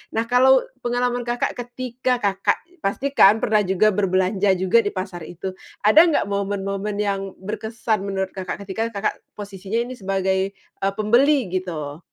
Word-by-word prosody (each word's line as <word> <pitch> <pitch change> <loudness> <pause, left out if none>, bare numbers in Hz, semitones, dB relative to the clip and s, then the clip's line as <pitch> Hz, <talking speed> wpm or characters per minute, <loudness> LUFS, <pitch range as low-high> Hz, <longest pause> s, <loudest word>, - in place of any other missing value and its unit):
nah 225 - +2
kalau 255 +2 +5 0.2
pengalaman 245 0 -1
Kakak 240 0 0
ketika 245 0 -3
Kakak, 195 -1 +1 0.3
pastikan 220 -1 +4
pernah 215 0 +3
juga 190 +3 +3
berbelanja 190 0 +2
juga 190 +5 +4
di 205 - -2
pasar 185 -2 -5
itu. 175 +2 -6 0.4
Ada 305 +10 +8
nggak 335 -3 +2
momen-momen 200 0 -2
yang 195 -2 -2
berkesan 220 +2 -2
menurut 190 -1 -2
Kakak 185 0 -5
ketika 205 +4 -2
Kakak 205 -1 -1 0.2
posisinya 200 +1 -4
ini 250 +1 -7
sebagai, 190 0 -1
eee, 195 0 -4
pembeli 235 +7 +4 0.2
gitu? 165 -6 -4
200 Hz, 145 wpm, -22 LUFS, 190-235 Hz, 0.4 s, Ada